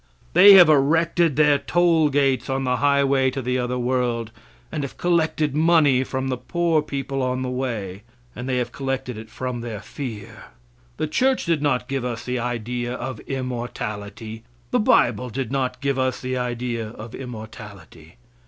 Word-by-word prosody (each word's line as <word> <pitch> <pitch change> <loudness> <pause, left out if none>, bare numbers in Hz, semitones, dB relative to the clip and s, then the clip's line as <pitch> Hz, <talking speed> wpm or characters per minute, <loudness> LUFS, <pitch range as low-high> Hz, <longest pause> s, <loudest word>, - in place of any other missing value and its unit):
They 200 +1 +9
have 180 -4 +9
erected 160 +2 +3
their 150 -1 +4
toll 165 +1 +3
gates 135 -2 +1
on 135 0 -1
the 125 -1 0
highway 140 -1 +3
to 130 - -4
the 125 0 -1
other 125 0 -2
world, 120 -2 -1 0.4
and 155 - -3
have 140 - -6
collected 160 -4 +1
money 155 -5 +4
from 130 0 -3
the 130 - -1
poor 165 +5 0
people 140 -2 -4
on 130 0 -1
the 125 - -3
way, 110 -7 -4 0.3
and 125 +2 -5
they 130 - +1
have 120 -1 -2
collected 135 -2 -3
it 110 +1 -9
from 125 0 -4
their 115 -3 -5
fear. 110 -3 -8 0.5
The - - -1
church 255 +12 +1
did 165 -3 +1
not 140 -4 0
give 135 -1 -2
us 120 -2 -4
the 125 0 -2
idea 120 +1 -3
of 125 -2 -5
immortality; 110 -4 -5 0.3
the - - +2
bible 125 - +3
did 130 0 -4
not 130 -2 -2
give 140 -1 0
us 130 -1 0
the 130 0 -3
idea 120 -2 -3
of 110 +1 -10
immortality. 105 -8 -10
130 Hz, 170 wpm, -23 LUFS, 120-140 Hz, 0.5 s, They